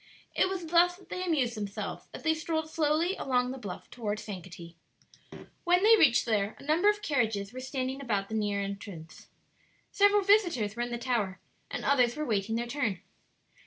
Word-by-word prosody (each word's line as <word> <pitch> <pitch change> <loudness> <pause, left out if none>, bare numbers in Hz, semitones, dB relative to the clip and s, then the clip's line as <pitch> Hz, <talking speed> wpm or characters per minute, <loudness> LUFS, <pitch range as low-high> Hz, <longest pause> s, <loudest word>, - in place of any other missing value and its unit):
It - - +2
was 375 -3 -4
thus 345 +2 +4
they 365 0 -6
amused 285 -9 +1
themselves 205 -2 -5
as - - -9
they 320 -1 +3
strolled 315 0 -2
slowly 315 +4 +1
along 250 -2 0
the 265 - -7
bluff 200 -6 -7
toward 215 -4 -3
Sankaty. 180 -4 -9 0.9
When 355 +2 +3
they 450 +2 +8
reached 310 - +4
there 215 -3 0
a - - -14
number 320 +8 +3
of 420 0 -1
carriages 220 -7 0
were 255 - -6
standing 260 +1 -3
about 205 -6 -2
near 210 -2 0
the - - -1
entrance, 195 -5 -9 0.6
several 405 0 +4
visitors 345 - +3
were 240 - -3
in 240 - -2
the 240 - -3
tower, 230 -7 -1 0.3
and - - -5
others 250 -4 +3
were 305 - -3
waiting 220 -2 0
their 235 +1 -1
turn. 240 -7 -2
250 Hz, 180 wpm, -29 LUFS, 210-325 Hz, 0.9 s, they